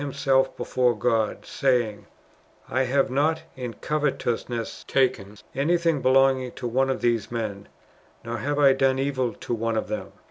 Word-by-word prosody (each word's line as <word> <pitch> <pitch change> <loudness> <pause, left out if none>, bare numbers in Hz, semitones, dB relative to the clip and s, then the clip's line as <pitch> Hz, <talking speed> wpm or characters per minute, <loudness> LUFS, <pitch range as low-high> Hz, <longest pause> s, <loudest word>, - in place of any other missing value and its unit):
himself 135 -1 +1
before 125 -3 +1
God, 110 0 0
saying, 120 -7 0 0.6
"I 130 +1 +1
have 135 +1 +1
not 150 +4 +1
in 125 -3 -6
covetousness 120 -6 -2
taken 125 -7 0 0.2
anything 165 +1 +1
belonging 130 -1 +3
to 120 - -5
one 130 +3 +1
of 135 - -1
these 115 -3 0
men, 105 -4 -4 0.6
nor 120 0 -3
have 145 +1 -2
I 140 -2 +6
done 135 0 +2
evil 130 -3 -1
to - - -5
one 115 0 -1
of 110 - -2
them." 105 - -4
130 Hz, 150 wpm, -25 LUFS, 115-135 Hz, 0.6 s, I